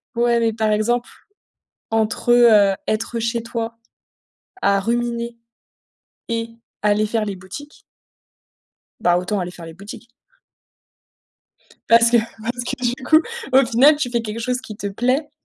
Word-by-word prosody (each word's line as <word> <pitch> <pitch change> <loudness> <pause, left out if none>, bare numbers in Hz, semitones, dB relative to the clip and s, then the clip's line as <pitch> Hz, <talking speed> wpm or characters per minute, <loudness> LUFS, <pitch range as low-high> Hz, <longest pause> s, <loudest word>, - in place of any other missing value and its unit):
Ouais, 235 0 +2
mais 225 -1 +1
par 220 -1 0
exemple, 240 +3 0 0.8
entre, 225 +2 0
heu, 215 -5 +6
être 225 +2 -2
chez 230 0 -1
toi, 230 0 -5 0.8
à 200 0 +2
ruminer 235 +1 -2 0.9
et 230 0 -2 0.3
aller 210 +1 +2
faire 220 0 -1
les 200 -2 -4
boutiques 190 +12 -11 1.2
Bah, 175 0 +3
autant 185 +3 -2
aller 180 -1 -4
faire 175 -1 -11
les 165 - -10
boutiques 200 +5 -11 1.8
parce 230 0 +6
que 240 - +6 0.2
parce 240 +2 -3
que 255 0 -5
du 260 - -10
coup, 315 +5 +5 0.3
au 265 0 +6
final, 265 +6 +5
tu 285 -4 -2
fais 235 -1 0
quelque 220 0 -5
chose 250 +2 -1
qui 215 - -9
te 205 - -5
plaît 255 +9 0
230 Hz, 145 wpm, -20 LUFS, 210-240 Hz, 1.8 s, heu